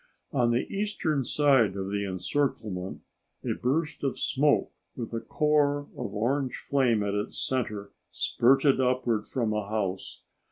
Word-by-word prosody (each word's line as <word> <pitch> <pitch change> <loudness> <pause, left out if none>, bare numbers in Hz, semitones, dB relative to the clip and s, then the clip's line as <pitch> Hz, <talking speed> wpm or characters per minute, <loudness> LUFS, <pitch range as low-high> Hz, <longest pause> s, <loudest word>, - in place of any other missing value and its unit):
On 125 -6 +2
the 120 +1 +1
eastern 185 -8 0
side 130 -7 +3
of 95 0 -3
the 100 0 -1
encirclement 95 -2 -2 0.4
a - - 0
burst 150 +5 -1
of 135 - -1
smoke 145 +2 +2 0.2
with 120 -2 -6
a 115 - -1
core 145 0 +2
of 110 -4 -5
orange 130 +5 0
flame 125 -6 +1
at 100 -1 -1
its 105 0 -3
center 105 -6 -2 0.2
spurted 135 +2 +3
upward 125 -4 +1
from 115 -5 -1
a 105 -1 -2
house. 100 -4 -3
125 Hz, 145 wpm, -28 LUFS, 105-140 Hz, 0.4 s, side